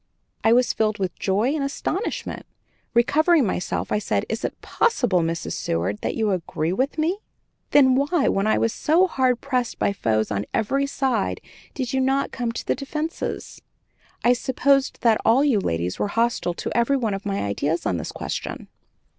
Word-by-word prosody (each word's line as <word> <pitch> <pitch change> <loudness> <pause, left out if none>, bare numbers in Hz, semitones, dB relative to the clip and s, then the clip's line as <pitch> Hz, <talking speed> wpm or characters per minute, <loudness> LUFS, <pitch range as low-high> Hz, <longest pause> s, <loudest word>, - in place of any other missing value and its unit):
I 225 - +4
was 245 +1 +4
filled 215 -1 0
with 185 -3 -2
joy 210 +8 +1
and 305 -3 -1
astonishment. 310 +8 -3 0.5
Recovering 290 +5 +4
myself, 180 -2 -2
I 210 - +2
said, - - -1
"Is - - -3
it - - -3
possible, 245 - +1
Mrs. 165 0 -2
Seward, 90 +5 -2
that - - -2
you 220 -2 +1
agree 165 -2 -2
with 265 +9 -1
me? 335 +6 0 0.5
Then 265 -3 +6
why, 285 +3 +2
when 195 +2 +1
I 215 - +3
was 230 - +1
so 335 +5 +3
hard 255 -8 +1
pressed 255 -4 -1
by 200 - +1
foes 110 - 0
on 100 0 -2
every 275 +6 +1
side, 260 -7 -1 0.4
did 255 -3 -3
you 265 - +2
not 270 +1 +1
come 240 -2 -2
to 230 - -6
the - - +2
defense? 300 +3 -4 0.6
I 245 - +5
supposed 270 +2 +1
that 225 -2 +4
all 240 +5 +4
you 270 -8 +3
ladies 85 - -2
were - - +1
hostile 230 -5 0
to - - -4
every 235 +4 +3
one 225 -5 -1
of 195 +1 -4
my 200 -1 -2
ideas 145 +12 -1
on 90 - 0
this 80 - -5
question." - - -5
235 Hz, 180 wpm, -23 LUFS, 195-275 Hz, 0.6 s, Then